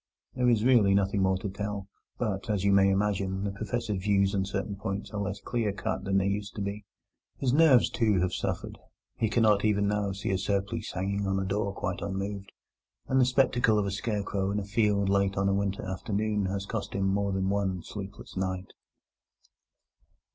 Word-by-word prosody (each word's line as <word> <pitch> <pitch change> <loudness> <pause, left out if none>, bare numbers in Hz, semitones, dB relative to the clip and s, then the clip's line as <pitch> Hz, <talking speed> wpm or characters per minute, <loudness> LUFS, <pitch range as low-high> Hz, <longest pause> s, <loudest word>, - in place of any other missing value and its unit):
There 125 -1 +2
is 115 -3 +3
really 110 -7 +5
nothing 100 0 +1
more 95 0 +2
to 95 - -4
tell, 100 0 -4 0.3
but, 105 -4 -2
as 100 -3 0
you 100 0 +4
may 100 0 +5
imagine, 95 -1 0
the 100 - -1
Professor's 110 0 -3
views 100 0 +2
on 95 -1 +1
certain 100 +1 -3
points 100 +1 -4
are 105 -2 -3
less 100 0 -3
clear 115 -3 -1
cut 100 - -3
than 95 0 +2
they 95 - +2
used 100 0 -2
to 105 - -4
be. 100 +1 -5 0.5
His 130 -2 0
nerves, 145 -5 +6
too, 105 -5 +2
have 90 0 0
suffered: - - -3 0.4
he 110 - 0
cannot 110 -2 +3
even 100 -2 +2
now 105 -1 0
see 100 +1 -3
a 95 - 0
surplice 100 +3 -2
hanging 100 +2 -1
on 95 0 +1
a 95 - -1
door 100 +1 -1
quite 90 -2 -4
unmoved, 100 0 -4 0.6
and 130 0 +3
the - - +5
spectacle 125 -3 +3
of 105 - +1
a 100 - -2
scarecrow 100 -2 -2
in 100 - -1
a - - -4
field 100 -1 +1
late 100 0 +1
on 100 0 +2
a 100 - +2
winter 100 0 -1
afternoon 105 +2 -1
has 100 +1 -3
cost 110 0 -4
him 100 -1 0
more 100 +1 +1
than 95 0 0
one 95 -3 -1
sleepless 100 +1 -8
night. 95 0 -3
100 Hz, 200 wpm, -28 LUFS, 95-105 Hz, 0.6 s, nerves